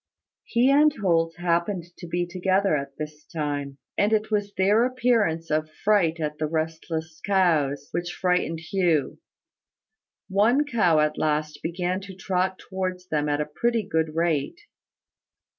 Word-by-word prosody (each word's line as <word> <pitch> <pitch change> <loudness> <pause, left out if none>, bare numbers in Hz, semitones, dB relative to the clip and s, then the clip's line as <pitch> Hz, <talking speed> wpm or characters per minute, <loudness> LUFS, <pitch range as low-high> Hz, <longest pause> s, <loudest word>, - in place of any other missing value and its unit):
He 245 +3 +3
and 300 +2 +6
Holt 165 -4 +1
happened 175 +2 0 0.2
to 175 - -8
be 175 +1 -1
together 185 +1 +1
at 140 -1 -4
this 150 0 -7
time; 145 -3 -4 0.2
and 205 +1 +2
it 215 0 +1
was 205 -1 0
their 205 +4 +4
appearance 230 -11 +1
of 155 0 0
fright 180 -6 +3
at 150 -1 -3
the 155 - 0
restless 160 0 -3
cows 155 -8 +2
which 175 0 -2
frightened 180 -3 0
Hugh. 165 -4 0 1.1
One 225 +9 +3
cow 195 - +3
at 150 0 0
last 150 -1 -1
began 180 +3 -2
to 195 -1 -10
trot 185 -1 -1
towards 185 -1 -5
them 150 -1 0
at 145 0 +1
a - - -1
pretty 230 +9 0
good 160 -3 -1
rate. 165 - 0
175 Hz, 145 wpm, -25 LUFS, 155-195 Hz, 1.1 s, and